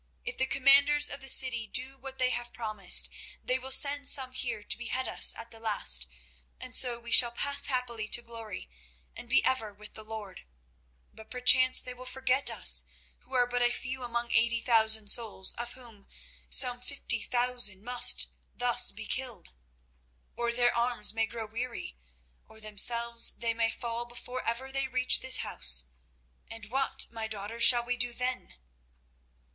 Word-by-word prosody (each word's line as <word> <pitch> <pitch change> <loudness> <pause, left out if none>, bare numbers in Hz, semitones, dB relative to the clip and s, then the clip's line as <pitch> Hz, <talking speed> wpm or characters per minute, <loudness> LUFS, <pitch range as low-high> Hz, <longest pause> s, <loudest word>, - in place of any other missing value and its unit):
If 470 - -7
the 260 - -2
commanders 280 +2 +2
of 280 - -8
the 270 - -4
city 240 -4 +1
do 260 +5 -4
what 270 0 -13
they 255 -1 -2
have 240 -1 -6
promised, 215 -5 +3 0.4
they 255 +1 -2
will 260 +1 -11
send 285 +1 +4
some 260 -2 +4
here 235 -4 -4
to - - +1
behead 255 +2 -4
us - - +4
at 230 +1 -11
the 225 - -13
last, 65 - 0 0.5
and 255 0 -9
so 245 -2 +4
we 235 0 -12
shall 240 - +6
pass 280 +4 -1
happily 240 -4 -5
to 240 - +1
glory 225 - -11 0.5
and 240 - -12
be 265 - +2
ever 225 -5 -2
with 210 +1 -16
the 220 - -11
Lord. 215 -3 -11 0.7
But 220 0 -17
perchance 255 +1 +4
they 250 - -9
will 250 +1 -14
forget 260 +1 -2
us, - - +5 0.3
who 260 - -13
are 245 -1 +1
but 245 0 -4
a 240 - +1
few 260 +1 -7
among 235 -1 -6
eighty 235 0 +1
thousand 220 -3 0
souls, 210 -5 +1
of 240 0 -7
whom 235 -6 -15 0.4
some 245 -2 +5
fifty 250 -3 -5
thousand 240 -5 -2
must 245 +1 +4 0.3
thus 245 0 +4
be 220 - -9
killed. 250 - -5 0.8
Or 235 0 -4
their 240 0 -1
arms 235 -3 -1
may 225 0 -3
grow 230 -1 -9
weary, 230 - -9 0.5
or 220 - -17
themselves 235 +2 +4
they 230 -1 -5
may 225 0 -2
fall 235 +1 -7
before 245 +1 -10
ever 260 +3 -5
they 270 0 -4
reach 255 0 +1
this 260 0 +1
house—and 60 - -3
what, 270 +1 -1
my 225 -1 -7
daughters, 215 +2 -8
shall 240 0 +5
we 245 0 -5
do 240 0 -2
then?" 250 - -5
240 Hz, 170 wpm, -27 LUFS, 220-255 Hz, 0.8 s, shall